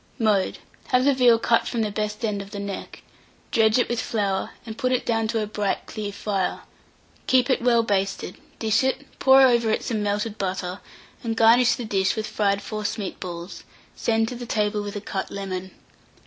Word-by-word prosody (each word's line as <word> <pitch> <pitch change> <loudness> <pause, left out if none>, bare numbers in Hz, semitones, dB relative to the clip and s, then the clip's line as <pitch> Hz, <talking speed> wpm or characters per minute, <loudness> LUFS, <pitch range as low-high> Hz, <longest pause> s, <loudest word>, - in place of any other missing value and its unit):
Mode. 215 -5 +1 0.3
Have 250 0 +3
the 280 - +5
veal 245 -3 +5
cut 230 0 +2
from 235 - -1
the 210 - -2
best 210 +2 -2
end 205 -2 -1
of 200 - -10
the 205 - -7
neck; 200 -1 -6 0.5
dredge 220 0 +4
it 245 - +2
with 240 -1 -1
flour, 200 -4 -1 0.2
and 220 -2 -7
put 255 +1 -1
it 255 - 0
down 225 -1 +1
to 225 -1 0
a - - -1
bright 210 -1 -2
clear 210 -2 -5
fire; 200 -2 -2 0.7
keep 255 0 +4
it - - +1
well 235 -1 +4
basted; 195 -3 -1 0.2
dish 220 +2 +2
it, 265 +2 -1
pour 265 0 +7
over 235 -3 +4
it 220 - 0
some 220 -3 -2
melted 210 +1 -2
butter, 185 -1 -3 0.4
and 225 -1 -2
garnish 230 +1 +6
the 240 - -5
dish 190 -2 +1
with 220 -1 -2
fried 200 -2 0
forcemeat 215 -2 -4
balls; 175 0 -7 0.3
send 225 -1 +1
to 245 -1 -6
table 210 -1 0
with 205 0 -6
a 205 - -4
cut 195 -2 -4
lemon. 190 -2 -5
215 Hz, 190 wpm, -24 LUFS, 200-235 Hz, 0.7 s, pour